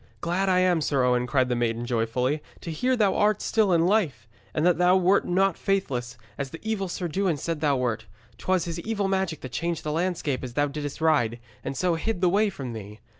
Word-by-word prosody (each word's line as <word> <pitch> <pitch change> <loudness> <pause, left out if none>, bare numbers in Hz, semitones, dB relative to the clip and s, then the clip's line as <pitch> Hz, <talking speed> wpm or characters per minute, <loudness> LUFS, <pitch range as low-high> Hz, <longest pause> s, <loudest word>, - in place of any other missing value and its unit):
'Glad 185 +3 0
I 185 0 +4
am, 180 -3 +3
Sir 140 -3 +1
Owen,' 125 0 +2
cried 130 -1 +2
the 125 - 0
maiden 120 0 -1
joyfully, 125 +4 0 0.2
'to 170 - -6
hear 250 +11 +1
thou 210 -5 +2
art 210 -1 +3
still 215 -4 +2
in 170 -1 +4
life, 175 - +1 0.2
and 155 - 0
that 180 -1 +3
thou 180 +1 +5
wert 185 +2 +3
not 190 0 +2
faithless, 125 -12 -1 0.2
as 140 -1 -2
the 165 - -9
evil 220 -3 -1
Sir 175 0 -3
Dewin 180 -1 0
said 165 +1 -3
thou 145 -3 +2
wert. 115 -3 -2 0.3
'Twas 185 -2 +1
his 170 0 -4
evil 205 +1 -1
magic 190 -5 -1
that 130 - -7
changed 170 +4 -2
the 150 - -2
landscape 160 -5 -1
as 125 -1 -6
thou 145 - +3
didst 145 +1 -5
ride, 120 -8 +2 0.2
and 135 - -4
so 180 +2 +2
hid 180 +5 -2
the 180 -1 +3
way 205 +3 +3
from 135 -10 -6
thee. 105 -1 -9
165 Hz, 225 wpm, -26 LUFS, 130-185 Hz, 0.3 s, thou